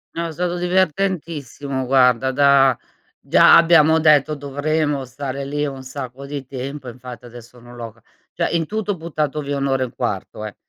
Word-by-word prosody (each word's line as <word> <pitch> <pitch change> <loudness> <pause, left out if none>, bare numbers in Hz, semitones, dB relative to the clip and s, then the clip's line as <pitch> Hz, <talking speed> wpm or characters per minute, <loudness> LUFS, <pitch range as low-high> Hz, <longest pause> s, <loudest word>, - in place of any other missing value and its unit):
No, 170 0 -2
è - - -6
stato 175 +2 -2
divertentissimo, 165 -7 -1
guarda. 130 0 +3
Da 135 -2 +4 0.4
già - - +6
abbiamo 160 -1 +5
detto: 155 -1 +4
“Dovremo 145 0 -2
stare 135 +2 -6
lì 145 +1 -2
un 135 -1 -7
sacco 130 0 -8
di 140 -1 -6
tempo”. 135 0 -6
Infatti, 125 -1 -11
adesso, 120 0 -13
non 120 +1 -14
l'ho 115 -2 -7
c 115 +1 -27 0.3
cioè, - - -1
in 165 -1 0
tutto, 210 +2 -3
ho - - -9
buttato 155 -2 -3
via 140 0 -3
1 135 -1 0
e - - 0
1/4 105 -2 -5
eh, 105 - -8
140 Hz, 175 wpm, -20 LUFS, 130-155 Hz, 0.4 s, già